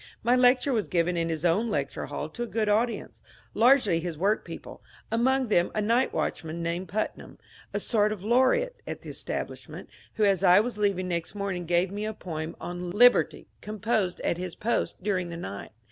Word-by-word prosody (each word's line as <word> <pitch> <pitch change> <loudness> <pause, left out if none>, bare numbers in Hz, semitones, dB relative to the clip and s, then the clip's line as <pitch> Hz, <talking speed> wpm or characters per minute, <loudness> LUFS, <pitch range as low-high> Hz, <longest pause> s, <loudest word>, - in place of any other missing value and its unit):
My 240 +2 +4
lecture 255 +2 +4
was 220 -4 0
given 175 0 +1
in 165 -1 0
his 160 0 -2
own 200 +8 +2
lecture 210 - -2
hall - - -4
to 240 - -8
a 240 - -1
good 220 -1 -1
au^ence, 225 +3 0 0.3
largely 230 -8 +4
his 165 -2 -5
work 200 +6 +1
people, - - -9 0.3
among 255 +2 +2
them 175 -4 +3
a - - +1
night 230 +5 +2
watchman 165 +1 -3
named 170 +2 -2
Putnam, 215 +2 -4 0.3
a - - -2
sort 210 -2 +2
of 205 -3 -5
laureate 260 - +2
to - - -3
the - - -12
establishment, - - -6 0.2
who 215 - +1
as 195 -3 +2
I 180 +2 +7
was 220 0 -2
leaving 195 -3 +1
next 170 +2 -3
morning 195 -4 -3
gave 175 +2 +2
me 205 +1 -3
a 215 0 -4
poem 160 -3 -5
on 175 0 -5
^^ - - -8
Liberty," 245 +3 +5 0.2
composed 210 -3 -1
at 170 - -1
his 180 -2 -5
post 225 -4 -2
during 185 -4 -1
the 170 - -6
night. 100 - -7
205 Hz, 195 wpm, -27 LUFS, 175-230 Hz, 0.3 s, I